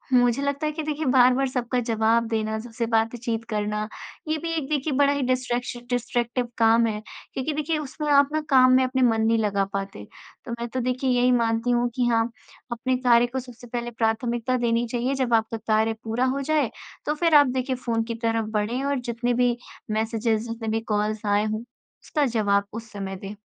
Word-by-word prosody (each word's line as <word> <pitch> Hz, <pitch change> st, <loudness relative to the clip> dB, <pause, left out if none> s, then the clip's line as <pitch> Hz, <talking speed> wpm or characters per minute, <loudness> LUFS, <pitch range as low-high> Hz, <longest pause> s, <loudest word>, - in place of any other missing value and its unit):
मुझे 245 Hz, +1 st, +3 dB
लगता 280 Hz, +2 st, -1 dB
है 305 Hz, -, 0 dB
कि 310 Hz, +1 st, -4 dB
देखिए, 305 Hz, 0 st, -3 dB
बार-बार 255 Hz, 0 st, +4 dB
सबका 250 Hz, -1 st, -1 dB
जवाब 225 Hz, +1 st, +2 dB
देना, 220 Hz, -1 st, -1 dB
सबसे 230 Hz, +1 st, -4 dB
बातचीत 225 Hz, 0 st, 0 dB
करना, 210 Hz, 0 st, -1 dB, 0.4 s
ये 310 Hz, 0 st, 0 dB
भी 330 Hz, +2 st, -4 dB
एक 305 Hz, -4 st, -2 dB
देखिए 295 Hz, 0 st, 0 dB
बड़ा 285 Hz, 0 st, +4 dB
ही 285 Hz, -, -1 dB
डिस्ट्रैक्शन 245 Hz, -1 st, -2 dB
डिस्ट्रैक्टिव 245 Hz, 0 st, -1 dB
काम 230 Hz, 0 st, +5 dB
है 210 Hz, -1 st, -3 dB, 0.3 s
क्योंकि 270 Hz, +4 st, -2 dB
देखिए, 305 Hz, +2 st, -1 dB
उसमें 300 Hz, +1 st, -5 dB
आप 280 Hz, 0 st, +5 dB
ना 310 Hz, -, +1 dB
काम 255 Hz, -2 st, +6 dB
में 260 Hz, 0 st, +5 dB
अपने 260 Hz, 0 st, 0 dB
मन 225 Hz, -3 st, +3 dB
नहीं 225 Hz, +1 st, +3 dB
लगा 200 Hz, -3 st, +1 dB
पाते। 195 Hz, -, -4 dB, 0.4 s
तो -, -, -6 dB
मैं 235 Hz, -, -3 dB
तो 260 Hz, -, -1 dB
देखिए 255 Hz, +2 st, -1 dB
यही 250 Hz, 0 st, +3 dB
मानती 230 Hz, 0 st, +1 dB
हूँ 240 Hz, 0 st, +2 dB
कि 250 Hz, -2 st, +1 dB
हाँ, 230 Hz, -1 st, +2 dB, 0.4 s
अपने 255 Hz, +2 st, 0 dB
कार्य 245 Hz, -1 st, +4 dB
को 265 Hz, -, 0 dB
सबसे 245 Hz, -1 st, -11 dB
पहले 240 Hz, 0 st, -4 dB
प्राथमिकता 235 Hz, +2 st, 0 dB
देनी 235 Hz, -1 st, +1 dB
चाहिए। 250 Hz, +3 st, 0 dB
जब 240 Hz, -2 st, -1 dB
आपका 225 Hz, 0 st, +1 dB
कार्य 220 Hz, 0 st, +1 dB
पूरा 230 Hz, +3 st, 0 dB
हो 280 Hz, -, -2 dB
जाए, 290 Hz, -3 st, +1 dB, 0.3 s
तो 300 Hz, -, +1 dB
फिर 330 Hz, 0 st, +3 dB
आप 290 Hz, -1 st, +8 dB
देखिए 255 Hz, +1 st, -1 dB
फ़ोन 235 Hz, -2 st, -1 dB
की -, -, -3 dB
तरफ 225 Hz, -1 st, 0 dB
बढ़ें, 220 Hz, +5 st, -1 dB
और 280 Hz, -1 st, 0 dB
जितने 240 Hz, 0 st, -1 dB
भी 245 Hz, 0 st, +2 dB, 0.3 s
मैसेजेज़, 225 Hz, +1 st, 0 dB
जितने 230 Hz, 0 st, -5 dB
भी 220 Hz, +1 st, 0 dB
कॉल्स 210 Hz, +1 st, -1 dB
आए 205 Hz, +1 st, +2 dB
हों, 215 Hz, +1 st, -2 dB, 0.4 s
उसका 300 Hz, -3 st, 0 dB
जवाब 205 Hz, -5 st, +1 dB
उस 225 Hz, 0 st, -8 dB
समय 195 Hz, -2 st, -5 dB
दें। 195 Hz, +2 st, -8 dB
240 Hz, 200 wpm, -25 LUFS, 225-260 Hz, 0.4 s, आप